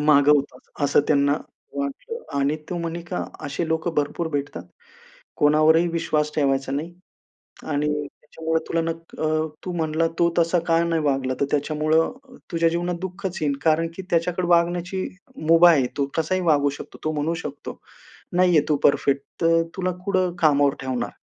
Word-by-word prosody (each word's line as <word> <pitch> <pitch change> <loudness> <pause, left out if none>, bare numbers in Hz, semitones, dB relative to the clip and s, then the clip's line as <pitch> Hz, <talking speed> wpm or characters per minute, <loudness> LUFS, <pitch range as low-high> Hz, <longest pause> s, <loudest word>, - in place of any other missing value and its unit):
माग 150 -1 +4
होतास 145 -1 +2 0.2
असं 140 - +4
त्यांना 140 -1 +3 0.4
वाटलं. 140 - -4 0.2
आणि 140 +2 +1
तू 175 - -2
म्हणे 170 0 -4
का, 180 - -2 0.2
असे 150 +4 -3
लोकं 160 +1 -1
भरपूर 150 +3 -1
भेटतात. 145 -1 -3 0.8
कोणावरही 155 +3 +4
विश्वास 155 -2 0
ठेवायचा 135 -2 +1
नाही. 160 +5 -3 0.7
आणि 150 0 -1 0.2
त्याच्यामुळे 160 +3 -3
तुला 165 - 0
न 165 - -2
अ, 165 -1 -5 0.4
तू 180 - -3
म्हणाला 160 0 0
तो 170 0 +3
तसा 170 +1 +3
काय 165 0 +3
नाही 165 -1 0
वागला, 135 -2 0
तर - - +4
त्याच्यामुळं 155 +2 +1 0.4
तुझ्या 165 -1 +2
जीवनात 175 +1 -1
दुःखच 190 0 -5
येईल. 145 -2 +1
कारण 165 +1 +3
की - - -5
त्याच्याकडे 175 +1 0
वागण्याची 175 +2 +1 0.4
मुभा 170 +1 +7
आहे. 135 -5 +3
तो 140 - +2
कसाही 175 +3 0
वागू 145 -4 +3
शकतो. - - -10
तो 155 - 0
म्हणू 155 +2 -1
शकतो, - - -7 0.5
नाहीये 180 -4 +4
तू 150 - +4
परफेक्ट, 140 -1 +3 0.2
तर 165 0 +4
तुला 185 -1 -1
कुठं 185 -3 +1
कामावर 145 -3 +4
ठेवणार? 130 -2 -2
160 Hz, 160 wpm, -23 LUFS, 145-170 Hz, 0.8 s, मुभा